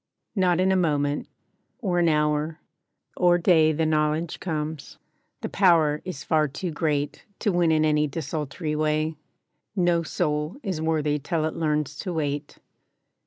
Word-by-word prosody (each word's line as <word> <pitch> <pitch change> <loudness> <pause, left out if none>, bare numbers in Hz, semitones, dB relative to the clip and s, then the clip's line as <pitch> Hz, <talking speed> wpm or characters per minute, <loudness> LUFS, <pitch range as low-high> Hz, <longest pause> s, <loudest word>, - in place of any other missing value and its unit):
Not 180 -3 +2
in 190 +1 +3
a - - +3
moment, 145 -5 0 0.5
or 180 -7 0
an 170 -1 +4
hour, 150 +1 +1 0.6
or 175 -1 +4
day 165 -3 +4
The 160 +1 0
knowledge 155 +1 0
comes; 155 -3 -4 0.4
the - - -2
power 165 -6 +3
is 180 -7 -6
far 155 -1 +2
too 165 +6 -4
great, 150 -2 -1 0.2
To 210 - +2
win 175 -2 +3
in 155 0 +3
any 150 0 +2
desultory 150 +1 -4
way. 155 +1 0 0.6
No 175 -3 +2
soul 155 - -2
is 185 -7 -2
worthy 155 -2 +1
till 155 +2 -1
it 155 - -3
learns 150 -2 -1
to 180 - -4
wait. 145 -2 -3
155 Hz, 150 wpm, -25 LUFS, 150-175 Hz, 0.6 s, an